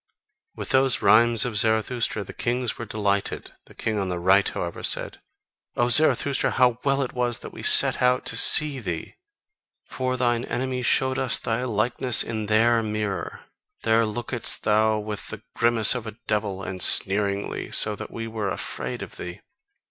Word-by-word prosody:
With - - -7
those 130 -2 +2
rhymes 115 0 +4
of 115 -4 -3
Zarathustra 110 0 0
the - - -11
kings 125 0 -2
were 115 - -5
delighted; 100 -2 -2 0.2
the - - -18
king 110 -1 -2
on 95 -1 -2
the 90 - -3
right, 95 +3 +3
however, 85 -1 -5
said: - - -1 0.5
"O 120 0 +1
Zarathustra, 145 0 +3
how 125 -2 +2
well 140 0 +1
it 130 - -6
was 120 -1 -1
that - - -10
we - - -9
set - - +4
out 125 0 +2
to - - -1
see 150 -3 +5
thee! 85 -8 -5 0.7
For 130 -1 -3
thine 120 -1 0
enemies 130 -1 -2
showed 130 0 +2
us 130 -2 +2
thy 115 +2 -2
likeness 120 +2 0
in 110 -2 -5
their 115 +2 +3
mirror: 105 -2 -4 0.4
there 115 0 +3
lookedst 120 +2 -3
thou 110 0 +2
with 105 -1 -6
the 110 -1 -8
grimace 115 -2 +3
of 120 -3 -5
a 110 0 -9
devil, 100 -3 -2
and 95 0 -6
sneeringly: 100 0 +1
so 105 -1 +1
that - - -8
we 115 - -6
were 110 -3 -4
afraid - - -5
of - - -11
thee. 90 0 -8
115 Hz, 170 wpm, -24 LUFS, 105-125 Hz, 0.7 s, see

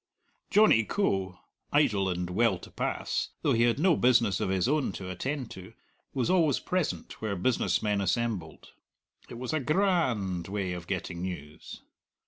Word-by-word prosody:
Johnny 210 - +5
Coe, 95 - -1 0.3
idle 105 -10 +3
and 90 0 -3
well 110 0 +2
to - - -13
pass, - - -2
though - - +3
he 115 - +2
had 120 -1 +2
no 170 +1 +4
business 120 -7 +3
of 105 -3 -1
his 95 +2 +1
own 145 -4 +1
to 95 -1 -6
attend 130 +6 -4
to, 95 +4 -10 0.4
was 130 -4 -1
always 165 -7 +3
present 180 -3 -3
where 110 -2 -2
business 95 -2 +1
men 105 -2 +1
assembled. 100 -4 -2 0.6
It 120 - -8
was 130 +5 -4
a 155 - +1
gra 175 +3 +2
and 95 -7 -3
way 95 -2 -2
of 90 -1 -7
getting 90 -2 -4
news. 80 -5 -7
105 Hz, 165 wpm, -29 LUFS, 95-135 Hz, 0.6 s, Johnny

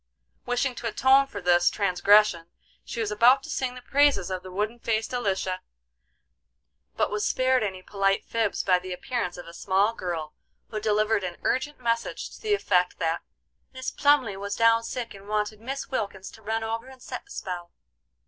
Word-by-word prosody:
Wishing 245 +1 +1
to 240 - -5
atone 265 +4 +4
for 205 -7 -7
this 175 0 +4
transgression 200 -2 +3 0.4
she 235 - -5
was 215 -2 -1
about 245 +6 +5
to 315 - -7
sing 255 -4 -2
the 250 - -10
praises 275 -11 +3
of 185 -1 -2
the 185 - -10
wooden 210 +5 -2
faced 225 +1 -1
Elisha, 190 -6 -1 1.3
but - - +1
was 210 0 -1
spared 255 0 +2
any 190 -3 -3
polite 195 0 0
fibs 225 -3 0
by 180 -1 +4
the 185 0 -6
appearance 180 -1 -3
of 175 - -8
a 170 - -11
small 195 +5 +1
girl 170 -7 -4 0.4
who 215 - -3
delivered 215 0 +1
an 180 -2 -4
urgent 260 +3 -1
message 230 -1 -2
to - - -13
the 425 -1 +2
effect, 180 - +1
that 165 0 -1 0.5
"Mis 260 0 -4
Plumly 285 -8 +3
was 200 +1 -4
down 230 0 +4
sick 235 0 -5
and 200 0 -13
wanted 210 0 -1
Mis 270 +4 -5
Wilkins 200 -6 -3
to 220 - -15
run 220 +1 -2
over 225 +2 -3
and 265 0 -13
set - - -7
a - - -23
spell." 175 - -6
215 Hz, 185 wpm, -26 LUFS, 190-245 Hz, 1.3 s, about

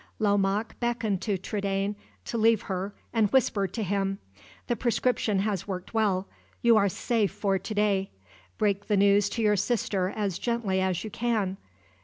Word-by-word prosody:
Lomaque 205 0 +1
beckoned 235 -5 -1
to 205 -4 0
Trudaine 200 +1 -2 0.3
to - - -5
leave 225 -1 +3
her, 195 +1 -4 0.2
and 220 -3 +3
whispered 205 -7 +2
to 225 - -1
him: 195 0 -1 0.5
"The 240 - 0
prescription 235 -3 +1
has 200 -3 -2
worked 185 0 -5
well. 200 -4 +1 0.4
You 235 -1 +6
are 200 -2 +4
safe 220 +2 0
for 195 -1 0
to 195 +4 -5
day. 200 -2 +1 0.5
Break 200 -1 0
the 210 - +2
news 200 +1 +4
to 230 +2 -2
your 210 -1 +4
sister 200 -3 0
as 200 -5 -2
gently 230 -6 0
as 185 -1 0
you 215 - -6
can. 215 -5 -1
205 Hz, 165 wpm, -27 LUFS, 195-220 Hz, 0.5 s, You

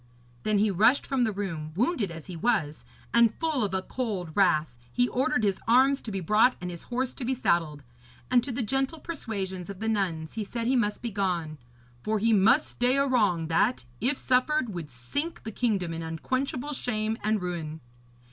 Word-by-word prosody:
Then 215 +7 +1
he 210 +1 +3
rushed 220 +9 +4
from 260 -3 +1
the 220 - 0
room, 165 -7 -4
wounded 235 - +1
as 165 -2 -9
he 185 - -8
was; 170 -6 0 0.3
and, 235 -2 +5
full 315 -7 0
of 200 - -1
a 190 - -1
cold 200 -10 -3
wrath, 155 -8 +2 0.2
he 245 0 +2
ordered 250 -2 0
his 195 -2 +1
arms 265 +4 +4
to 220 - -6
be 195 - -2
brought 215 +8 +4
and 180 0 -5
his 170 - -7
horse 250 +1 -1
to 270 - -7
be 260 +2 0
saddled. 165 - 0 0.5
And 245 -2 +5
to 265 - -4
the 250 +1 -2
gentle 270 +7 0
persuasions 195 - -5
of 195 -2 -7
the 220 - -3
nuns 180 -7 -1
he 220 - -3
said 230 +3 -4
he 260 +3 +2
must 210 -3 0
be 235 - -2
gone, 175 -6 -2 0.4
'for 220 - 0
he 225 +2 +3
must 220 +9 +5
stay 250 +2 +1
a 275 - +3
wrong 205 -11 +2
that, 205 - +2
if 260 +5 +1
suffered, 255 +1 +2
would 170 -6 -6
sink 140 - -4
the 220 - -5
kingdom 200 -7 0
in 165 - -4
unquenchable 255 - -2
shame 220 -4 -2
and 215 0 +1
ruin.' 165 -4 -4
215 Hz, 200 wpm, -27 LUFS, 180-250 Hz, 0.5 s, and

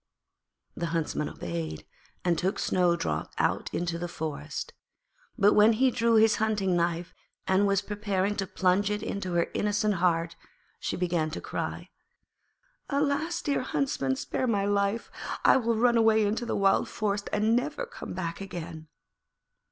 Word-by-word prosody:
The 170 - -2
Huntsman 165 -2 -1
obeyed, 80 -2 -5 0.4
and 175 -1 +3
took 185 +4 -1
Snowdrop 170 - 0
out - - 0
into 170 -1 -2
the 175 - -3
forest, 160 -3 -5 0.6
but 205 -2 +5
when 215 +2 +6
he 255 +3 +3
drew 230 -1 +2
his 220 -1 +5
hunting 210 -4 +1
knife 170 0 -1 0.3
and 190 +2 +3
was 200 0 +2
preparing 205 -1 -1
to 195 -1 -2
plunge 190 +3 +2
it 210 0 -2
into 185 -3 -3
her 170 -1 +1
innocent 210 0 +1
heart, 170 -2 +1 0.4
she - - -3
began 175 -3 0
to 155 - -5
cry: - - -5 1.0
'Alas! 290 +5 0
dear 285 - 0
Huntsman, 140 - -1
spare 255 - -2
my 200 -4 +1
life, 200 +2 0 0.3
and - - +8
I - - +5
will 235 -2 +1
run 235 +1 +3
away 220 -1 +4
into 220 +4 -1
the - - -1
wild 195 -1 +3
forest 205 -1 -2
and 215 +2 +2
never 300 - -1
come - - -8
back 170 0 -4
again.' 170 -4 -7
200 Hz, 155 wpm, -28 LUFS, 170-220 Hz, 1.0 s, and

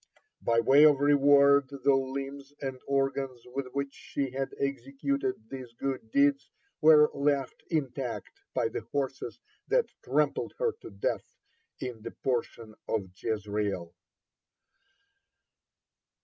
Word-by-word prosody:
By 115 0 +2
way 135 +5 +6
of 145 -3 +6
reward 140 -1 +5
the 140 0 +2
limbs 135 +1 -3
and 135 -2 -4
organs 135 -2 0
with 130 +2 -4
which 140 0 -2
she 135 -2 -4
had 135 +1 -2
executed 140 0 -1 0.2
these 130 -3 -7
good 130 -2 -4
deeds 140 +2 +3 0.3
were 150 -1 +7
left 140 -2 0
intact 135 - -3
by 115 - +1
the - - -4
horses 135 -5 -3 0.3
that - - +3 0.2
trampled - - 0
her 480 -2 +1
to - - -9
death 100 -1 -3 0.4
in 125 -4 -5
the 115 - -5
portion 115 -3 -3
of 100 -5 -2
Jezreel. 105 -5 -2
135 Hz, 120 wpm, -29 LUFS, 120-140 Hz, 0.4 s, were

